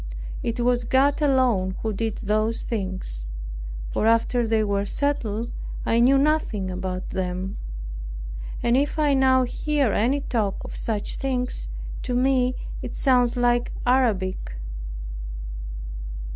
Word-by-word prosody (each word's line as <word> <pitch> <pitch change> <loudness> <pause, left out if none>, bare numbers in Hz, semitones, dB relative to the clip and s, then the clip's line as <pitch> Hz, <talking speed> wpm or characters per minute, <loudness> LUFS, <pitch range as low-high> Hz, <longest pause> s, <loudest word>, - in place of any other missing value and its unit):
It 230 +1 -2
was 245 0 +3
God 270 +5 +3
alone 250 -10 +3
who 220 -1 0
did 220 +1 -1
those 215 +2 +1
things; 185 - -3 0.7
for 220 - +2
after 230 +1 +3
they 220 -1 +3
were 200 -1 +1
settled 230 -2 -1 0.3
I 230 - +3
knew 260 +3 +6
nothing 270 -10 +1
about 185 0 -3
them; 185 +1 -2 1.1
and 235 0 +4
if 285 +4 +1
I 295 -2 +4
now 260 -1 +5
hear 280 -1 +1
any 260 +7 +2
talk 215 -7 -1
of - - -7
such 215 -3 -1
things, 255 -2 -1 0.3
to 250 - -2
me 255 0 +3 0.3
it - - -5
sounds 250 -3 +3
like 240 0 +2
Arabic. 200 - +2
235 Hz, 125 wpm, -25 LUFS, 205-260 Hz, 1.1 s, knew